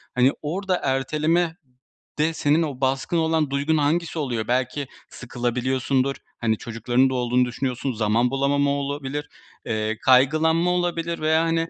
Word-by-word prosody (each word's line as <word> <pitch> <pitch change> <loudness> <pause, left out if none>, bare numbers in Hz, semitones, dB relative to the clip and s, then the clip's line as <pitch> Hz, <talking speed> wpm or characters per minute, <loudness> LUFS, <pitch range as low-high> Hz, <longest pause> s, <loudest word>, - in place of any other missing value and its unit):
Hani, 125 +2 +4
orada 185 +5 -1
erteleme 155 +5 0 0.6
de 160 +2 +2
senin 155 +1 +2
o 140 -4 -5
baskın 135 +5 0
olan 160 -2 +1
duygun 145 +3 +1
hangisi 160 +3 0
oluyor? 120 -7 -2
Belki 130 +3 -1 0.2
sıkılabiliyorsundur, 130 +2 -1 0.2
hani, 110 -2 0
çocuklarının 120 +4 0
da - - -3
olduğunu 125 0 +2
düşünüyorsun, 125 +2 -3
zaman 115 +3 +1
bulamama 140 +1 +1
olabilir, 140 +1 -3 0.4
eee, 110 -1 -2
kaygılanma 155 +7 +4
olabilir 170 -1 -1
veya, 160 +1 +2
hani, 165 0 0
140 Hz, 135 wpm, -23 LUFS, 125-160 Hz, 0.6 s, Hani